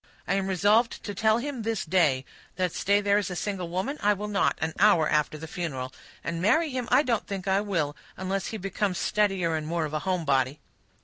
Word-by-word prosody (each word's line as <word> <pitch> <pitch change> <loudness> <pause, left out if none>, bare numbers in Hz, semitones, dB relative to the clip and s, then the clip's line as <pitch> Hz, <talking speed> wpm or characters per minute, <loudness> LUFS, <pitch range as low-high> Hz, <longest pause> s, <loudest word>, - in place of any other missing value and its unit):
I - - +1
am 195 -1 0
resolved 205 +5 +2
to 205 - -4
tell 215 +3 +3
him 265 0 -4
this 225 -1 -2
day, 155 -7 +2 0.3
that 185 -2 -1
stay 200 +1 +2
there 205 0 +3
a - - -2
single 180 -1 -3
woman, 190 - -2
I 210 0 +4
will 205 +1 -5
not 205 -1 +1
an 160 0 -2
hour 185 -6 +5
after 150 0 +1
the 160 - -7
funeral; 135 -7 -4 0.3
and 170 0 -3
marry 300 - +3
him 255 -2 -3
I 255 +4 +5
don't 235 -6 -1
think 195 -1 -5
I 195 +1 +3
will, 165 -8 -1 0.2
unless 190 +1 -2
he 220 - -4
becomes 195 -1 -2
steadier 195 -6 +1
and 155 -1 -3
more 165 0 0
of 150 - -6
a 155 - 0
home 180 -1 -1
body." 135 0 +1
190 Hz, 215 wpm, -27 LUFS, 165-210 Hz, 0.3 s, hour